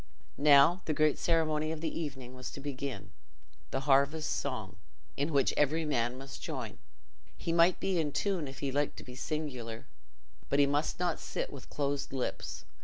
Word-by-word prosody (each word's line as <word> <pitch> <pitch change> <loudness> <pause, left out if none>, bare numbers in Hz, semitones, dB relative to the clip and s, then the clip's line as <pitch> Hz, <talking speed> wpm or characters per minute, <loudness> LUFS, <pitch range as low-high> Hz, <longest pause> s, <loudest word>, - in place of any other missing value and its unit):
Now, 145 +5 +7
the 155 - 0
great 155 -1 +3
ceremony 155 -2 +2
of 160 - -4
the 160 0 -2
evening 135 -5 -5
was 130 0 -6
to - - -7
begin—the 135 -1 -7
harvest 140 +3 +3
song, 110 -9 -3 0.4
in 145 +3 0
which 140 -3 +3
every 155 +3 +2
man 120 -4 0
must 135 0 -8
join. 130 -9 -5 0.6
He 165 - -2
might 170 +2 +5
be 190 -3 +1
in 150 -2 0
tune, 185 -3 0
if 135 +1 -9
he 140 -2 -1
liked 145 +2 0
to - - -8
be 125 - -10
singular, 130 -6 -4 0.6
but 140 - +2
he 145 - +6
must 145 +4 0
not 175 -2 0
sit - - -4
with 140 - -10
closed 140 -1 -1
lips. 130 -2 -3
145 Hz, 175 wpm, -32 LUFS, 135-155 Hz, 0.6 s, Now